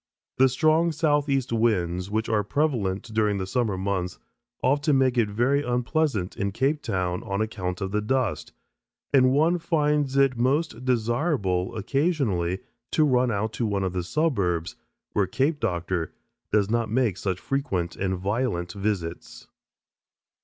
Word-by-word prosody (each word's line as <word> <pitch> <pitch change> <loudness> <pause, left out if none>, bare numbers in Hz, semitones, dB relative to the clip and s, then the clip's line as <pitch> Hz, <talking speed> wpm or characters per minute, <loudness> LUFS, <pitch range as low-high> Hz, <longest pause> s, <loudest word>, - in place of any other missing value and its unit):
The 130 +1 +5
strong 155 +5 +3
southeast 145 -5 +1
winds, 90 -5 +1
which 110 +2 -1
are 110 -2 +1
prevalent 110 -7 0
during 105 -2 +2
the 95 - -2
summer 105 0 -1
months, 95 -1 -2 0.5
often 145 +1 +3
make 130 -1 +2
it 115 -4 +2
very 120 +7 +2
unpleasant 125 - 0
in 100 0 -2
Cape 140 +8 0
Town 90 -3 -2
on 100 -3 -3
account 95 -4 -3
of 95 0 -2
the 105 +1 0
dust, 125 -1 -1 0.6
and 130 -2 +5
one 160 +6 +3
finds 150 -4 +1
it 135 -2 +4
most 130 -1 0
desirable 120 - 0
occasionally 110 - 0 0.3
to 155 - +2
run 125 -3 +3
out 110 0 -1
to 115 0 -1
one 100 -2 -1
of 95 -1 -2
the 90 - -1
suburbs 90 - 0 0.4
where 100 -2 +2
"Cape 145 - 0
Doctor" 85 - -2 0.4
does 105 -2 +3
not 115 0 0
make 115 -4 +1
such 95 -1 -2
frequent 100 -12 -2
and 95 -1 -1
violent 95 -2 -1
visits. 100 -5 -4
110 Hz, 145 wpm, -25 LUFS, 95-135 Hz, 0.6 s, The